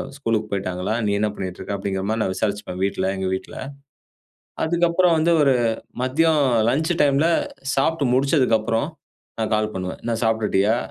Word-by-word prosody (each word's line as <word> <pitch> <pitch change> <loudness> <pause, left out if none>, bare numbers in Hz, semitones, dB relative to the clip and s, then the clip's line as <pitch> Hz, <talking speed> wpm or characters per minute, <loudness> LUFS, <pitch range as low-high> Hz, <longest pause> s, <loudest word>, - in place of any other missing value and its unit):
ஸ்கூலுக்கு 115 -6 -1
போய்ட்டாங்களா? 95 +1 -2
நீ 100 - +1
என்ன 105 - +1
பண்ணிட்ருக்க?"அப்டிங்கிற 95 +1 -4
மாரி 110 0 0
நான் 95 - -1
விசாரிச்சுப்பேன் 100 -2 -3
வீட்ல, 95 -1 0
எங்க 95 0 -2
வீட்ல. 95 - -5 1.1
அதுக்கப்புறம் 170 +1 +3
வந்து 170 +2 +3
ஒரு 135 -2 +4 0.5
மதியம் 155 +4 +2 0.3
லஞ்ச் 160 +5 +1
டைம்ல 145 +3 +3 0.5
சாப்ட்டு 140 -1 +1
முடிச்சதுக்கு 130 -4 +3
அப்புறம், 115 +5 -1 0.5
நான் 110 0 -1
கால் 110 0 -1
பண்ணுவேன். 90 0 -5
"என்ன 115 -1 -1
சாப்ட்டுட்டியா? 110 -1 +2
115 Hz, 140 wpm, -22 LUFS, 100-145 Hz, 1.1 s, ஒரு